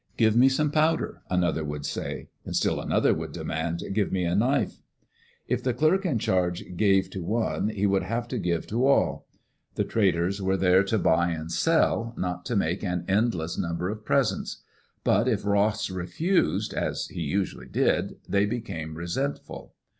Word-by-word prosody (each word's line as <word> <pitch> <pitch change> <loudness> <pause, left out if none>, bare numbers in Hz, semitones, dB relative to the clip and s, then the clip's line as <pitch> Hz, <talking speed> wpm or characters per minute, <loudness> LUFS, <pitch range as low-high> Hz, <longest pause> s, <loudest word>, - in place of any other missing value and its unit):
"Give 110 -2 +4
me 125 +3 +6
some 145 +2 +1
powder," 155 +1 +1
another 90 -3 +1
would 75 -1 -5
say. - - -4 0.2
Still - - 0
another - - +2
would - - -4
demand, 80 +2 -3
"Give 105 -1 0
me 95 -1 0
a 85 0 0
knife." 125 +8 +1 0.7
If - - 0
the 125 -2 -1
clerk 175 +8 +2
in 140 -9 +1
charge 90 -4 0
gave 95 0 +3
to 95 - -5
one, 110 +2 0
he 105 -2 -1
would 100 -1 +2
have 115 +6 -3
to - - -2
give 85 -2 -1
to 120 +5 +1
all. 140 - +2 0.5
The - - +1
traders 95 -2 +1
were 95 0 +1
there 95 0 +5
to 110 +3 +1
buy 85 -2 +3
and 80 -1 -4
sell, 115 - +1
not 90 -1 -3
to 120 - -2
make 90 -1 0
an 90 -3 -2
endless 95 -5 0
number 85 +2 -2
of 105 +1 -5
presents. - - 0 0.4
But - - +3
if 105 -5 0
Ross 105 0 +1
refused, 100 - 0
as - - -2
he - - -6
usually 95 +6 -2
did, - - +1
they 100 +1 +2
became 95 -9 -4
resentful. 85 - -4
100 Hz, 170 wpm, -26 LUFS, 85-115 Hz, 0.7 s, me